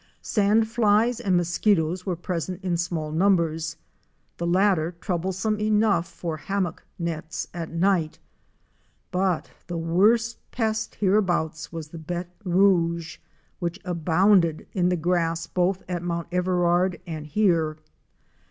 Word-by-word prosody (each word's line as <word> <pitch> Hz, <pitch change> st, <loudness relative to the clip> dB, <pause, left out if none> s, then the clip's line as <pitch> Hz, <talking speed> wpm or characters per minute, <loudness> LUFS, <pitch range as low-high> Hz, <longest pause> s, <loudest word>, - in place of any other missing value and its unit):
Sand 215 Hz, +1 st, +2 dB
flies 225 Hz, +1 st, +2 dB
and 185 Hz, -3 st, +2 dB
mosquitoes 175 Hz, 0 st, +1 dB
were 180 Hz, -, 0 dB
present 175 Hz, +1 st, -4 dB
in 180 Hz, -2 st, 0 dB
small 170 Hz, -3 st, -2 dB
numbers, 165 Hz, -2 st, +1 dB, 0.6 s
the 170 Hz, -, -2 dB
latter 180 Hz, -2 st, +2 dB
troublesome 190 Hz, +4 st, -1 dB
enough 210 Hz, -4 st, +2 dB
for 165 Hz, -3 st, -5 dB
hammock 190 Hz, -1 st, -2 dB
nets 165 Hz, -2 st, -4 dB
at 170 Hz, -2 st, -5 dB
night, 170 Hz, -2 st, +1 dB, 0.9 s
but 185 Hz, -2 st, 0 dB, 0.2 s
the 175 Hz, -, -4 dB
worst 210 Hz, +8 st, +2 dB
pest 220 Hz, -2 st, -2 dB
hereabouts 180 Hz, -5 st, +1 dB
was 165 Hz, -2 st, -6 dB
the 165 Hz, -, -9 dB
béte 175 Hz, +2 st, -5 dB
rouge 170 Hz, -3 st, +2 dB, 0.4 s
which 175 Hz, +2 st, -3 dB
abounded 175 Hz, 0 st, +3 dB
in 180 Hz, -2 st, +2 dB
the 180 Hz, -, +2 dB
grass 165 Hz, -1 st, 0 dB
both 185 Hz, +1 st, 0 dB
at 175 Hz, -2 st, -3 dB
Mount 170 Hz, -1 st, -3 dB
Everard 180 Hz, -1 st, +1 dB
and 155 Hz, -3 st, -6 dB
here. 165 Hz, -4 st, +2 dB
175 Hz, 125 wpm, -25 LUFS, 165-195 Hz, 0.9 s, abounded